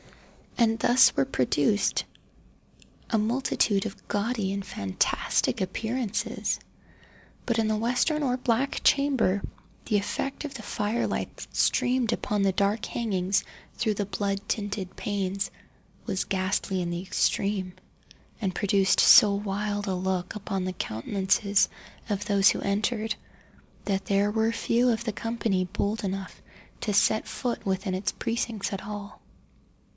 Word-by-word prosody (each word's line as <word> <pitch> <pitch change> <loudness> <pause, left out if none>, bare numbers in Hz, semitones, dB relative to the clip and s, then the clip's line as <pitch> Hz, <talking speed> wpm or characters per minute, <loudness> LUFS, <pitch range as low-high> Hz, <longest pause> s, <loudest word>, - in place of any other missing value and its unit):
And 225 -2 +3
thus 245 +2 +5
were 135 - +3
produced 145 - +1 1.0
a 225 - +2
multitude 215 -3 +1
of 195 - -7
gaudy 205 -1 -1
and 200 0 -3
fantastic 100 - 0
appearances. 220 +3 -2 0.9
But 235 -2 0
in 225 -1 +2
the 215 - +1
western 250 +7 +1
or 255 -3 +1
black 255 +2 0
chamber 265 -9 +3 0.4
the 215 - +2
effect 270 +8 -3
of 285 - -6
the 225 - -7
fire 210 +3 -1
light - - -3
that - - -10
streamed 245 -2 +2
upon 210 -1 -1
the 195 -1 +3
dark 200 +3 +1
hangings 195 -4 0 0.3
through 220 -2 0
the 205 - -1
blood 200 0 -2
tinted 200 -3 -3
panes, 195 -1 -2 0.6
was 195 -4 -1
ghastly 185 0 -1
in 175 - -2
the 175 0 -3
extreme, 195 0 0 0.7
and 190 -5 -2
produced 195 -2 +3
so 205 -2 +8
wild 205 0 -2
a 190 - 0
look 185 -1 -2
upon 195 -2 -3
the 185 - -2
countenances 195 - +1 0.4
of 205 -1 -1
those 200 -1 +5
who - - 0
entered, 215 +2 0 0.7
that 195 -1 -1
there 200 +1 +2
were 220 +1 +2
few 235 +2 +2
of 230 -1 0
the 220 -3 -2
company 225 -5 -1
bold 205 +3 -2
enough 195 -1 -4 0.4
to 210 - -1
set 220 +1 +3
foot 245 -2 -3
within 190 0 -1
its 185 +2 -1
precincts 230 -3 -2
at 195 - -4
all. 205 -1 -7
205 Hz, 140 wpm, -27 LUFS, 195-225 Hz, 1.0 s, so